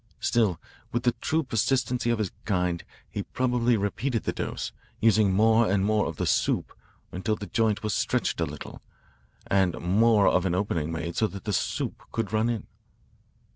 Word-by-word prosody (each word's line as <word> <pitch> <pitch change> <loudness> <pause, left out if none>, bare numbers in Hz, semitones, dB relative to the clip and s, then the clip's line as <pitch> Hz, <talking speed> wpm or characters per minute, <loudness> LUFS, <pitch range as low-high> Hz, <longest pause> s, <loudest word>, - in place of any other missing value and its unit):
Still, 105 -9 +1 0.3
with 120 +1 -1
the 120 - +4
true 160 +1 +1
persistency 125 0 0
of 120 - +2
his 105 -4 -2
kind, 90 -4 0 0.2
he - - -4
probably 125 -2 +1
repeated 110 +4 -1
the - - -1
dose, - - -4 0.3
using 110 -3 +4
more 110 +3 +4
and 95 -1 +2
more 110 0 +2
of 80 - -5
the - - -2
'soup' - - +1 0.4
until 100 +4 -1
the 105 - -7
joint 110 -1 0
was 105 -1 -1
stretched - - 0
a - - +1
little, - - -9 0.6
and 95 -3 +1
more 105 +3 +4
of 90 - +3
an 90 - 0
opening 85 -5 -1
made 80 +1 -4
so 110 - +2
that 100 -2 -9
the 105 - -2
'soup' - - -2
could 110 -3 -3
run 110 +2 +2
in. 115 -3 -2
105 Hz, 175 wpm, -27 LUFS, 95-115 Hz, 0.6 s, the